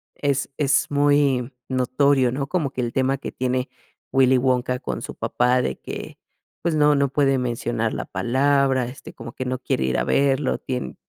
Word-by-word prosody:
es 140 -1 -1
es 140 -2 +2
muy 145 -3 +2 0.2
notorio, 130 0 +2
¿no? 140 +1 -3
Como 155 -4 -1
que 125 - -3
el 120 -1 -3
tema 135 +1 +1
que - - -6
tiene 130 +1 -2 0.4
Willy 130 -1 +5
Wonka 125 0 +1
con - - -4
su - - -7
papá, 125 +1 +1
de 65 - -3
que, - - -8 0.4
pues, 170 -1 +1
no 150 -1 +4
no 140 -1 +2
puede 135 -1 +2
mencionar 120 -2 -2
la - - -4
palabra, 135 +1 +1
este, 125 0 -10
como 120 - -9
que 130 - -5
no 130 0 -2
quiere 65 - -1
ir 65 - 0
a - - +1
verlo, 140 0 +2
tiene 125 -1 -4
130 Hz, 185 wpm, -23 LUFS, 125-140 Hz, 0.4 s, Willy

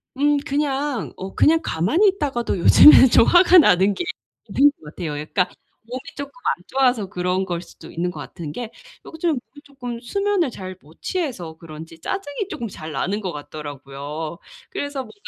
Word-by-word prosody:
음 290 +2 +3
그냥 280 -2 -1
어 190 +1 -8
그냥 325 +1 +4
가만히 240 - +2
있다가도 280 - -1
요즘에는 265 - +8
좀 230 - +6
화가 360 +4 +6
나는 190 - +4
게 275 - -3 0.5
있는 290 +1 +5
것 - - -16
같아요. 165 -4 -4
그러니까 155 +5 -1 0.3
몸이 245 +3 -6 0.2
쪼끔 285 0 -6
안 - - -1
좋아서 255 -5 +2
그런 180 +1 -1
거일 175 -2 -3
수도 175 - -14
있는 175 +2 -2
것 - - -10
같은 165 -5 -7
게 230 +7 -6 0.3
요즘 325 +1 -2
몸이 290 0 -5
쪼끔 245 -4 -7
수면을 395 +3 0
잘 185 -4 -8
못 155 +3 -21
취해서 250 - -3
그런지 160 0 -11
짜증이 385 - -4
쪼끔 235 - -5
잘 160 -5 -8
나는 190 +9 -2
것 185 -4 -3
같더라고요. 145 +1 -7 0.3
그래서 285 -1 -4
뭔가 220 - -14
230 Hz, 350 characters per minute, -22 LUFS, -, 0.5 s, 요즘에는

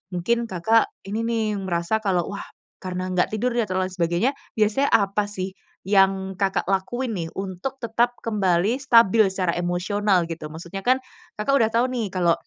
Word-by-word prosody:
mungkin 235 +7 0
Kakak 220 +5 +3 0.2
ini 215 +3 -3
nih 225 -2 0 0.2
merasa 175 +3 0
kalau, 185 -4 +1
wah, 200 - -6 0.4
karena 185 0 -4
nggak 180 - +2
tidur 245 +4 0
dia 235 -2 +1
ter 185 - -3
lain 185 0 0
sebagainya, 175 +8 +1 0.3
biasanya 220 +7 +2
apa 205 0 +1
sih, 190 -2 -4 0.3
yang 195 -1 +3
Kakak 195 0 +1
lakuin 225 +6 -1
nih, 165 -1 -3
untuk 195 +8 -4
tetap 235 +2 +1
kembali 205 +2 +1
stabil 230 -5 +5
secara 185 -2 -1
emosional, 180 +2 +1
gitu. 165 -2 -6
Maksudnya 170 +5 -7
kan, 255 +3 +3 0.4
Kakak 210 +6 0
udah 225 -4 +4
tahu 230 +2 +2
nih 235 -5 -1
kalau 170 -2 +3
195 Hz, 170 wpm, -23 LUFS, 180-225 Hz, 0.4 s, stabil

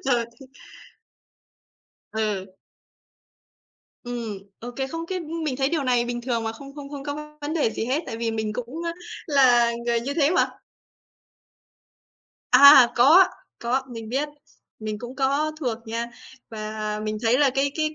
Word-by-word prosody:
Rồi 245 -3 +2 0.2
th 270 - -12 1.7
Ừ. 210 -3 -1 1.6
Ừm, 235 -4 -5 0.2
ô 240 +2 -6
kê, 265 - -1
không 330 +4 -5
cái 370 0 -3
mình 315 -4 -3
thấy 270 0 +1
điều 310 -3 -1
này 245 -2 +2
bình 240 0 -3
thường 235 -2 -2
mà 225 - -2
không 275 +4 -12
không 285 -2 -8
không 285 -2 -6
có 300 +1 -6
vấn 295 +2 -3
đề 290 -9 +2
gì 225 - -3
hết, 275 +7 0
tại 225 - -5
vì 230 0 -1
mình 220 -1 -2
cũng, 250 +8 -5
a, 335 - -1 0.3
là 245 -5 +5
người 235 -1 +2
như 275 +4 -4
thế 290 -2 +3
mà. 365 - +2 2.0
À, 265 -1 +9
có, 310 +10 +7 0.3
có, 245 +3 0
mình 225 -2 -7
biết. 275 +6 -1 0.5
Mình 215 -1 -4
cũng 245 +3 -8
có 280 +3 +1
thuộc 240 -5 -2
nha. 230 +1 -3 0.4
Và 215 -1 -4
mình 215 0 -3
thấy 235 +2 +3
là 285 -2 +4
cái 275 +2 0
cái 310 -1 -1
255 Hz, 165 wpm, -24 LUFS, 230-285 Hz, 2.0 s, À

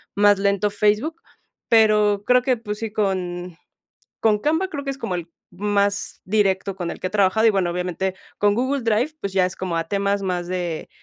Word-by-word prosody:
más 205 0 +5
lento 200 +1 +1
Facebook, 210 +11 0 0.5
pero 210 -2 +4
creo 250 0 +5
que, 255 0 +1
pues, 210 -2 -6
sí, 225 - -3
con 180 -4 -2 0.6
con 215 -2 +3
Canva 320 - 0
creo 295 -6 -5
que 275 - -2
es 270 - -9
como 185 - -2
el 170 -1 -6 0.2
más 200 +1 -1
directo 195 -1 +1
con 175 -3 -4
el - - -8
que - - -2
he - - -7
trabajado. 210 +2 +3
Y - - +7
bueno, 190 -4 +1
obviamente 180 +1 -2 0.2
con 205 0 +3
Google 260 +5 0
Drive, 230 +7 +1
pues, 200 -6 -4
ya 185 -1 +3
es 185 - -8
como 180 -3 -3
a 165 - -1
temas 200 +1 0
más 180 -2 -2
de, 175 -3 -3
200 Hz, 200 wpm, -22 LUFS, 185-220 Hz, 0.6 s, Y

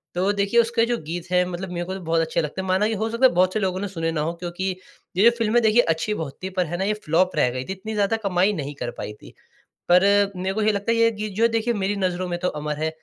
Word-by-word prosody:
तो 185 +3 +2
देखिए 200 +3 +2
उसके 230 0 +1
जो 240 0 -1
गीत 170 +3 -5
है 180 0 +4
मतलब 180 +1 -5
मेरे 175 0 -3
को 185 - -5
तो - - -6
बहुत 165 0 +3
अच्छे 160 0 0
लगते 150 +5 -4
हैं, 190 - -6
माना 190 +3 +2
कि 225 - -1
हो 220 +1 -1
सकता 230 +3 +2
है 260 - +7
बहुत 185 +1 +3
से 215 - 0
लोगों 185 -2 -1
ने 205 - -3
सुने 165 -3 -2
ना 160 -2 -1
हो, 165 +3 -1
क्योंकि 175 +2 -4 0.5
ये 195 - +4
जो - - 0
फ़िल्म 225 0 0
है, 240 - +6
देखिए 220 +1 +5
अच्छी 165 +3 -1
बहुत 155 -8 -5
थी 190 - -2
पर 180 - +3
है 175 +3 -4
ना 190 - -1
ये 210 - +1
फ्लॉप 175 +4 +2
रह 150 -5 +3
गई 125 +1 -4
थी, 190 - -4
इतनी 195 +3 -7
ज़्यादा 210 +1 +1
कमाई 190 +2 +2
नहीं 145 -5 -4
कर 120 -1 -3
पाई 105 - -5
थी। - - -14 0.6
पर 180 +1 +6 0.3
मेरे 185 +1 -2
को 215 - -1
ये 215 0 +3
लगता 205 +2 -1
है 230 - +2
ये 230 0 +4
गीत 210 -2 -5
जो 225 - +1
है 230 - +5
देखिए 230 +1 0
मेरी 200 -1 -1
नज़रों 185 -2 -1
में 175 -1 -2
तो 180 - -1
अमर 150 -1 -3
है, 155 +1 -1
190 Hz, 310 wpm, -23 LUFS, 170-215 Hz, 0.6 s, है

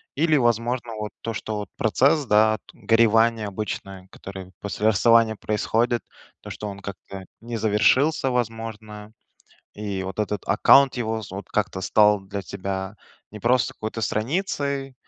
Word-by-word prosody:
Или, 155 +1 +3
возможно, 120 -1 0
вот 105 0 -5
то, 115 - -4
что 110 0 -4
вот 105 - -6
процесс, 140 +7 +2
да, 110 -1 +3
т - - -18
горевание 115 -1 +3
обычное, 95 -2 -6
который 95 -1 -10
после 105 +1 -1
расставания 115 +1 +4
происходит, 115 +3 0 0.4
то, - - -10
что 105 - -6
он 100 -1 -8
как-то 95 -1 -9 0.2
не 115 0 -5
завершился, 130 +7 +2
возможно, 110 -3 -4 0.6
и 100 -2 -4
вот 95 +3 -4
этот 105 -2 -2
аккаунт 135 +6 +5
его 110 -2 -2
з 100 - -10
вот 100 - -7
как-то 105 -2 -1
стал 105 +1 +4
для 100 0 -6
тебя 95 +1 -5 0.4
не 105 - -9
просто 125 +1 +2
какой-то 110 +1 -5
страницей, 140 - -2
110 Hz, 145 wpm, -24 LUFS, 105-120 Hz, 0.6 s, аккаунт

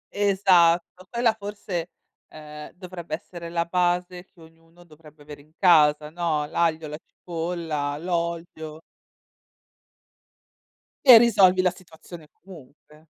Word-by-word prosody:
Esatto, 185 -3 +2
quella 235 -1 +1
forse, 200 -5 -6 0.4
ehm, 150 -1 -11
dovrebbe 180 -3 -7
essere 170 0 -10
la 170 0 -1
base 180 +1 -1
che 190 -2 -28
ognuno 165 +1 -20
dovrebbe 155 -2 -18
avere 145 -1 -12
in 155 +2 -26
casa, 150 -4 +4
no, 160 -3 -2
l'aglio, 160 0 -1
la 150 +1 -8
cipolla, 165 -4 -5
l'olio. 170 -2 -5 2.2
E 250 -4 +11
risolvi 195 -6 +4
la 185 - +2
situazione 170 -3 -14
comunque. 155 -2 -17
170 Hz, 110 wpm, -24 LUFS, 155-180 Hz, 2.2 s, E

